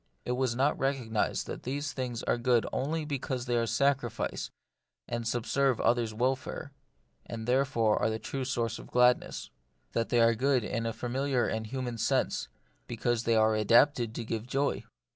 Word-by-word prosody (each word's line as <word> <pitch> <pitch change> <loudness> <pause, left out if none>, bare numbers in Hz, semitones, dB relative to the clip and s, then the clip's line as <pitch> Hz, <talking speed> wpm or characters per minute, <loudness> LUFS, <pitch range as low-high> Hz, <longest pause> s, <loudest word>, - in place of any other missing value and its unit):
It - - -2
was 125 -1 0
not 140 +4 +1
recognised 130 -5 0
that - - -6
these 140 +3 -3
things 125 -3 -4
are - - 0
good 120 -1 +3
only 155 +4 -1
because 130 -4 -3
they 120 -1 0
are 115 -1 +1
sacrifice, 135 -3 0 0.6
and 120 -1 -3
subserve 125 +2 +1
others* 120 -2 +2
welfare, 130 +5 -2 0.6
and 115 -1 -5
are - - -6
therefore 125 -4 +2
the 110 - -1
true 130 +4 -4
source 120 -4 -1
of - - -10
gladness; 125 0 +2 0.4
that 115 -1 -1
they 120 - +3
are 115 0 +5
good 130 +1 +2
in 115 +1 -2
a - - 0
familiar 130 +2 0
and 110 0 -2
human 125 -1 -4
sense, - - +1 0.4
because 120 0 -1
they 115 - +3
are 110 0 +4
adapted 115 +2 +3
to 120 - -4
give 115 +1 -4
joy. 140 +3 0
120 Hz, 170 wpm, -30 LUFS, 115-135 Hz, 0.6 s, are